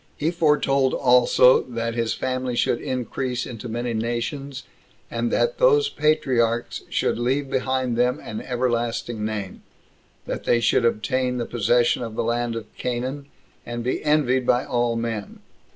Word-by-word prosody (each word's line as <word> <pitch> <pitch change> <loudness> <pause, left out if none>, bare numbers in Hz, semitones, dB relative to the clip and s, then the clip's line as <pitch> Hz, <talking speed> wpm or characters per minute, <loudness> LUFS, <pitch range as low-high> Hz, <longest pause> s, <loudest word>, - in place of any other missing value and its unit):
He 155 +3 0
foretold 150 -5 +2
also, 125 0 +5
that 115 -2 -4
his 115 -1 -1
family 130 -1 -2
should 120 - +1
increase 125 0 -3
into 120 -1 -7
many 120 +1 -2
nations 125 +5 -3 0.5
29 - - -5
and - - 0
that - - +1
those 440 -3 +4
patriarchs 120 - +1
should - - 0
leave 135 +3 0
behind 130 -2 0
them 125 +1 +1
an 110 - -6
everlasting 120 -2 -2
name; 105 -3 -4 0.6
that - - -5
they 120 - +3
should 120 +1 +2
obtain 125 +3 0
the 120 - -2
possession 120 +2 +2
of 115 -2 -5
the - - -1
land 120 0 -1
of 110 -2 -8
Canaan, 130 +3 -3 0.4
and 120 0 -5
be 125 - -2
envied 135 -4 +2
by 125 +1 +3
all 120 -1 0
men. 115 -3 -4
125 Hz, 150 wpm, -23 LUFS, 115-130 Hz, 0.6 s, also